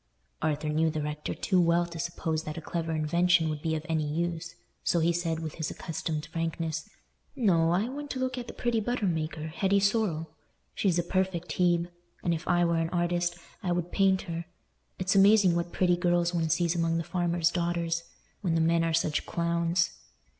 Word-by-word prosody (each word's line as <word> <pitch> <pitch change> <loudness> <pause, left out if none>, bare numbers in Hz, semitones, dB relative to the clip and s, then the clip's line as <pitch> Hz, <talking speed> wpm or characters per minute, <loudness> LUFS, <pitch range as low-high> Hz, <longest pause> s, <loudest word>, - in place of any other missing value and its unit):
Arthur 155 0 0
knew 160 +1 +2
the 155 -1 -2
rector 150 0 -4
too 185 -2 +2
well 170 0 +3
to 170 -1 -8
suppose 165 -1 -2
that 155 -1 -6
a - - -2
clever 165 0 -3
invention 165 +2 +3
would 150 -1 -3
be 160 0 0
of 155 0 -4
any 155 -3 0
use, 170 +1 -2 0.3
so - - +2
he 170 +1 +3
said, 165 -2 -1
with 155 -2 -4
his 160 -1 -3
accustomed 160 -1 -4
frankness, 165 -1 -3 0.5
"No, 180 -10 +3
I 185 +6 +2
went 290 +3 -6
to 260 - -3
look 255 0 -1
at 245 -2 -6
the - - -7
pretty 240 -2 0
butter 235 0 -1
maker 160 -3 -2
Hetty 195 +5 +2
Sorrel. 200 -6 +1 0.4
She's 185 -4 +1
a 175 - +2
perfect 185 -1 -1
Hebe; 175 0 +2 0.3
and 170 - +2
if 165 +1 -4
I 175 -1 +3
were 170 0 +2
an 165 0 0
artist, 175 0 0 0.2
I 185 -4 -1
would 175 0 -2
paint 195 -1 +3
her. 170 -1 -5 0.5
It's 185 +1 0
amazing 195 -2 +6
what 170 0 -1
pretty 180 -1 +2
girls 175 -1 +2
one 165 -2 0
sees 170 +1 +2
among 165 -1 +1
the 165 - -1
farmers' 175 -1 +1
daughters, 170 -1 -1 0.4
when 175 -5 0
the - - +3
men 165 +1 +3
are 165 -1 +1
such 155 -2 0
clowns. 170 0 +1
170 Hz, 195 wpm, -29 LUFS, 165-180 Hz, 0.5 s, amazing